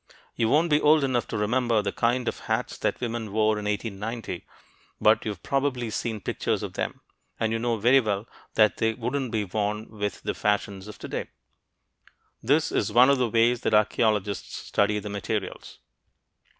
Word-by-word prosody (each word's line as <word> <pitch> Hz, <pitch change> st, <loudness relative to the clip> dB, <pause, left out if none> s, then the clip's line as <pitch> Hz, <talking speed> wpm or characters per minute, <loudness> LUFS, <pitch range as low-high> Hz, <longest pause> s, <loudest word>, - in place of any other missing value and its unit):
You 115 Hz, -1 st, +1 dB
won't 160 Hz, +4 st, +3 dB
be 150 Hz, -, +4 dB
old 150 Hz, 0 st, +5 dB
enough 130 Hz, -3 st, 0 dB
to 110 Hz, -, -3 dB
remember 115 Hz, +2 st, +2 dB
the 100 Hz, -, -1 dB
kind 120 Hz, +3 st, 0 dB
of -, -, -2 dB
hats 110 Hz, +1 st, -2 dB
that -, -, -1 dB
women 115 Hz, -3 st, -3 dB
wore 110 Hz, 0 st, +2 dB
in 105 Hz, -, -6 dB
1890, 105 Hz, -1 st, -4 dB, 0.5 s
but 110 Hz, +1 st, +4 dB
you've 105 Hz, -5 st, -4 dB
probably 135 Hz, -4 st, -1 dB
seen 110 Hz, -1 st, -3 dB
pictures -, -, -1 dB
of -, -, -5 dB
them, -, -, -4 dB, 0.4 s
and 110 Hz, 0 st, 0 dB
you 115 Hz, -, 0 dB
know 120 Hz, 0 st, 0 dB
very 125 Hz, +6 st, +5 dB
well 105 Hz, -2 st, -2 dB, 0.3 s
they 110 Hz, -1 st, +7 dB, 0.3 s
couldn't 125 Hz, +2 st, -2 dB
be 110 Hz, -2 st, -1 dB
worn 105 Hz, +2 st, -2 dB
with 105 Hz, -2 st, -4 dB
the -, -, -1 dB
fashions 100 Hz, -1 st, -1 dB
of 105 Hz, -, -9 dB
today. -, -, -5 dB, 1.1 s
This 145 Hz, +7 st, +2 dB
is -, -, 0 dB
one 125 Hz, +5 st, +6 dB
of 140 Hz, -, +2 dB
the 125 Hz, -2 st, +1 dB
ways 115 Hz, +2 st, +3 dB
that 110 Hz, -, +2 dB
archeologists 105 Hz, -1 st, +1 dB
study 105 Hz, +1 st, 0 dB
their 105 Hz, 0 st, -5 dB
materials. 100 Hz, 0 st, -4 dB
110 Hz, 175 wpm, -26 LUFS, 105-120 Hz, 1.1 s, they